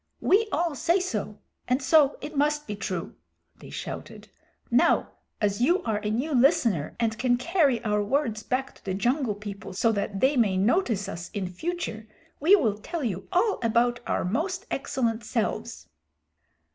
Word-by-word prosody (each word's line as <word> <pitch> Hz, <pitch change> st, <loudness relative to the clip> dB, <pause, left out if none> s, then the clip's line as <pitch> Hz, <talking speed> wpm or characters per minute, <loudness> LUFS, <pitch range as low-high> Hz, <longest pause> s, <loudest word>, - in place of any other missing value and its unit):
We 430 Hz, +4 st, +3 dB
all 335 Hz, +1 st, 0 dB
say 330 Hz, +6 st, +2 dB
so, 215 Hz, -, -3 dB, 0.3 s
and 250 Hz, +2 st, +2 dB
so 285 Hz, +1 st, +4 dB
it 305 Hz, -, -7 dB
must 295 Hz, +1 st, +1 dB
be 210 Hz, -, -4 dB
true," 205 Hz, -, -4 dB, 0.4 s
they -, -, -12 dB
shouted. -, -, -7 dB, 0.4 s
"Now -, -, +3 dB, 0.3 s
as 205 Hz, +1 st, 0 dB
you 350 Hz, +8 st, +3 dB
are 215 Hz, -2 st, -1 dB
a 210 Hz, 0 st, -3 dB
new 255 Hz, +8 st, -1 dB
listener 240 Hz, -, +3 dB
and 225 Hz, -2 st, 0 dB
can 245 Hz, -1 st, +2 dB
carry 285 Hz, -, +2 dB
our 210 Hz, -1 st, +1 dB
words 225 Hz, -1 st, 0 dB
back 265 Hz, +4 st, -2 dB
to -, -, -22 dB
the 190 Hz, -1 st, -2 dB
Jungle 245 Hz, +1 st, 0 dB
People 200 Hz, -2 st, -8 dB
so 230 Hz, +4 st, +2 dB
that 200 Hz, -1 st, -2 dB
they 265 Hz, +6 st, +3 dB
may 210 Hz, -7 st, +2 dB
notice 215 Hz, -, +1 dB
us 170 Hz, -3 st, -6 dB
in 200 Hz, -2 st, -1 dB
future, 220 Hz, -, -4 dB, 0.3 s
we 345 Hz, +8 st, +6 dB
will 215 Hz, -, 0 dB
tell 330 Hz, +8 st, -4 dB
you 195 Hz, -6 st, -3 dB
all 405 Hz, +4 st, +2 dB
about 240 Hz, +1 st, +2 dB
our -, -, 0 dB
most 360 Hz, -, -2 dB
excellent 235 Hz, -4 st, -1 dB
selves." 225 Hz, 0 st, -3 dB
240 Hz, 170 wpm, -26 LUFS, 210-300 Hz, 0.4 s, we